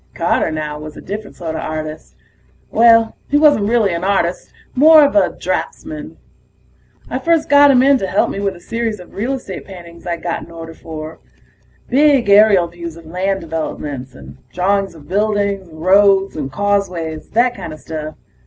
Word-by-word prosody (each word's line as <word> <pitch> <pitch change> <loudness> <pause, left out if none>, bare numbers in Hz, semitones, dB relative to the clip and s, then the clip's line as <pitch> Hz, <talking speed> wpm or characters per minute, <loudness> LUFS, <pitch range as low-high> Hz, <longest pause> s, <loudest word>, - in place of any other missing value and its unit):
Carter, 170 0 +1
now, 150 -1 -4
was 150 0 -9
a - - -8
different 205 +2 -7
sorta 160 -2 -5
artist. 155 0 -6 0.6
Well, 230 -1 +5
he 290 - +3
wasn't 290 -9 +4
really 225 -6 +2
an 170 +1 -3
artist 190 -3 -1 0.2
more 305 +2 +7
of 285 - -1
a 305 - +4
draftsman. 310 0 -5 0.9
I - - -3
first 330 -2 +1
got 285 0 +7
him 255 -2 +5
in 275 -1 +4
to 195 - -2
help - - +1
me - - -5
with 200 -1 -2
a - - -13
series 230 +2 -3
of 180 - -14
real 235 +7 -2
estate 250 -8 -7
paintings 170 -3 -12
I'd 170 -1 -4
got 170 -1 -2
an - - -12
order 165 -1 -9
for. 155 -1 -9 0.7
Big 275 -4 +3
aerial 200 -3 +6
views 170 -1 -9
of 165 - -14
land 190 +4 -2
developments, 150 -5 -5
and - - -13
drawings 195 0 0
of 150 -3 -15
buildings, 200 -1 -1
roads 195 +4 +3
and 140 -3 -4
causeways, 180 -5 -2
that 240 +2 +2
kinda 155 -8 -7
stuff. 155 -1 -7
195 Hz, 170 wpm, -17 LUFS, 165-230 Hz, 0.9 s, more